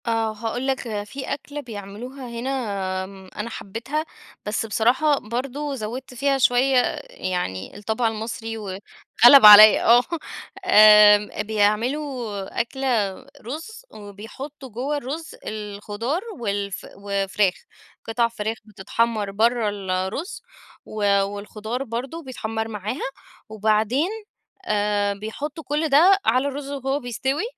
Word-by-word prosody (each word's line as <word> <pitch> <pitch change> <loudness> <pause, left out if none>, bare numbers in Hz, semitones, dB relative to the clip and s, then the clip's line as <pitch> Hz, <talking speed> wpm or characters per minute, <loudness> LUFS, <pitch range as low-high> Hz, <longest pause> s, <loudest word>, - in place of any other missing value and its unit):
آه 225 -1 0
هاقول 230 +4 -4
لك 230 -6 -2
في 265 +6 -8
أكلة 290 +1 -7
بيعملوها 240 +3 -8
هنا، 235 +2 -4 0.5
آمم، 190 0 -12
أنا 210 +3 -4
حبيتها 235 +10 -4 0.4
بس 210 +2 -2
بصراحة 250 +7 +2
برضو 275 +5 -4
زودت 250 +3 -6
فيها 275 +2 +1
شوية 260 +1 +3 0.3
يعني 180 - -4
الطبع 220 +3 -1
المصري 225 0 -4
وغلب 195 -3 -6 0.6
عليَّ، 210 +1 +10
آه 240 +2 +6 0.6
آمم، 210 - +7
بيعملوا 220 +1 -1
أكلة 235 -6 -1 0.3
رز 330 - -8
وبيحطوا 225 +8 -10
جوه 260 +6 -3
الرز 290 +4 -6
الخضار 210 - -4 0.2
والف 200 -5 -3
وفراخ، 200 -1 0 0.5
قطع 235 +1 +1
فراخ 225 -1 -4
بتتحمر 215 +1 -2
برّا 225 +2 +2
الرز، 195 - -4 0.4
و 205 -2 +1
والخضار 210 +5 -5
برضو 260 +7 -5
بيتحمر 225 -4 -4
معاها، 215 +3 -4 0.4
وبعدين 220 - +1 0.6
آآ، 205 - +1
بيحطوا 280 +10 -6
كُلّ 295 +4 -1
ده 350 +8 +6
على 255 +5 +2
الرز 280 0 -5
وهو 275 0 -2
بيستوي، 265 - -2
225 Hz, 110 wpm, -23 LUFS, 205-265 Hz, 0.6 s, عليَّ